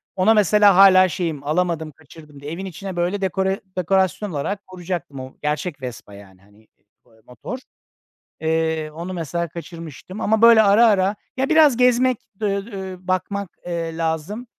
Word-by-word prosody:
Ona 190 +4 +4
mesela 210 -1 +5
hâlâ 185 -1 +7
şeyim, 160 -4 -3
alamadım 160 0 -1
kaçırdım 150 -1 -16
diye 145 +2 -7
evin 190 +3 -5
içine 185 +1 -7
böyle 180 +3 -1
dekore 190 +1 -1 0.2
dekorasyon 190 +2 +1
olarak 195 +8 -4
koyacaktım. 175 -6 -6
O 130 0 -9
gerçek 150 0 -3
Vespa 120 -5 -8
yani, 95 -2 -15
hani, 100 +1 -24 0.5
ııı, 115 - -25
aaa, - - -26
motor. 125 - -7 0.8
Eee, 160 -1 -1
onu 170 +4 -7
mesela 170 0 -3
kaçırmıştım. 170 +3 -9
Ama, 220 +1 +1
böyle, 230 -1 +8
ara 210 +3 +5
ara, 200 -1 +2 0.2
ya 265 +1 0
biraz 310 -6 +5
gezmek, 250 0 +3 0.2
d - - -2
ööö, 200 +1 -2
ööö, 190 -1 -6
bakmak, 185 +1 -3 0.2
eee, 165 -2 -4
lazım. 165 +9 -3
180 Hz, 160 wpm, -21 LUFS, 160-200 Hz, 0.8 s, böyle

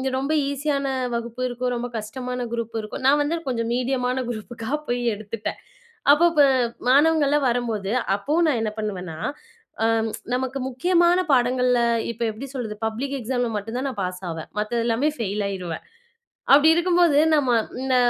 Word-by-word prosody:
ரொம்ப 275 +4 -1 0.2
ஈஸியான 280 0 -1 0.3
வகுப்பு 235 +1 -4
இருக்கும், 250 0 -2
ரொம்ப 240 0 -3
கஷ்டமான 250 +4 -5
குரூப் 230 -1 -4
இருக்கும். 215 +4 -6
நான் 285 +2 +5
வந்து 295 +3 0
கொஞ்சம் 230 -3 -1
மீடியமான 250 0 0
குரூப்புக்கா 230 0 -6 0.2
போய் 245 0 -1
எடுத்துட்டேன். 210 +1 -5 0.5
அப்போ 330 +4 +6
ப - - +8 0.5
மாணவங்கள்லாம் 295 0 +4
வரும்போது, 225 -5 -1 0.2
அப்பவும் 300 +12 +1
நான் 275 -7 +2
என்ன 215 - -1
பண்ணுவேன்னா, 185 -6 -4 0.7
அ 225 - +4 0.5
நமக்கு 260 +1 -1
முக்கியமான 345 +6 +3
பாடங்கள்ல, 250 -1 +3 0.3
இப்ப 230 - -12
எப்படி 230 +6 -8
சொல்றது? 225 -5 -4
பப்ளிக் 255 +6 -3
எக்ஸாம்ல 245 0 -1
மட்டும் 225 +4 -5
தான் 275 - -2
நான் 240 -6 -7
பாஸ் 180 0 -4
ஆவேன். 160 -1 -6
மத்த 230 +3 -1
எல்லாமே 240 +6 +2
ஃபெயில் 205 -1 -2
ஆயி்ருவேன். 185 -4 -5 0.7
அப்படி 290 +3 +7
இருக்கும்போது, 345 -3 +4 0.2
நம்ம 260 -5 +3 0.3
இந்த 265 -1 +1
245 Hz, 150 wpm, -23 LUFS, 220-275 Hz, 0.7 s, ப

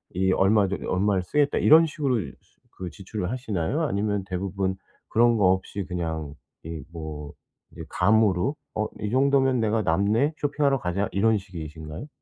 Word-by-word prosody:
이 95 +1 +2
얼마 100 +1 +3
저기 100 - -4
얼마를 95 0 +1
쓰겠다.' 145 +8 +1
이런 160 +2 +7
식으로 140 -6 -1
수 70 -7 -7 0.5
그 90 -1 -5
지출을 95 +2 -5
하시나요? 120 - -2
아니면 105 -6 -1
대부분 95 0 -2 0.3
그런 120 0 +4
거 95 -3 +4
없이 95 +1 -2
그냥 80 -5 -4 0.3
이 80 -3 -6
뭐 75 -3 -7 0.4
이제 - - -9
감으로 110 - +2 0.2
'어 105 0 0
이 105 - -2
정도면 135 0 +3
내가 110 0 +1
남네. 105 - +2
쇼핑하러 140 -1 +1
가자.' 95 +2 -1
이런 110 +3 +3
식이신가요? 80 - -8
100 Hz, 330 characters per minute, -25 LUFS, 90-120 Hz, 0.5 s, 이런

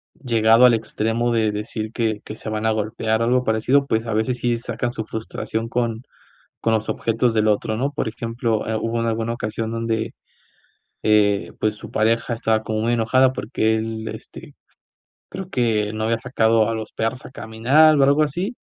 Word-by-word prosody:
llegado 115 -1 +4
al 125 - +6
extremo 115 +1 -1
de 110 -2 +2
decir 110 +1 -4
que 110 -3 -1
que 105 - -7
se 110 - -7
van 110 0 -2
a 110 - +3
golpear, 110 +1 -1
o - - +2
algo 125 +1 +2
parecido, 125 +5 +2
pues, 110 -3 0
a 115 - -2
veces, 110 +3 0
sí 120 -1 0
sacan 120 +1 -3
su 110 -3 -4
frustración 110 0 -4
con 115 -1 -1 0.6
con 115 - +1
los 110 0 -1
objetos 115 +1 0
del 110 -1 +2
otro, 110 +1 0
¿no? 135 +4 0
Por 140 - -2
ejemplo, 115 0 -2
eh, 110 - 0
hubo 115 +1 -1
en 115 - -1
alguna 115 0 -1
ocasión 110 -1 -3
donde, 115 0 -2 0.9
eh, 105 -2 +2
pues 110 0 0
su 105 - -11
pareja 115 +2 +1
estaba 110 -1 0
como 110 0 -2
muy 115 +1 +1
enojada 130 +3 +3
porque 110 -3 -1
él, 110 0 -3
este, - - -10 0.8
creo 190 -1 -7
que 110 -4 0
no 110 0 -2
había 115 +1 +1
sacado 115 -2 +2
a - - -1
los 110 -1 -5
perros 115 +3 -3
a - - -8
caminar 135 +7 +3
o 140 - +5
algo 140 +3 +4
así, 175 - -3
115 Hz, 195 wpm, -22 LUFS, 110-120 Hz, 0.9 s, al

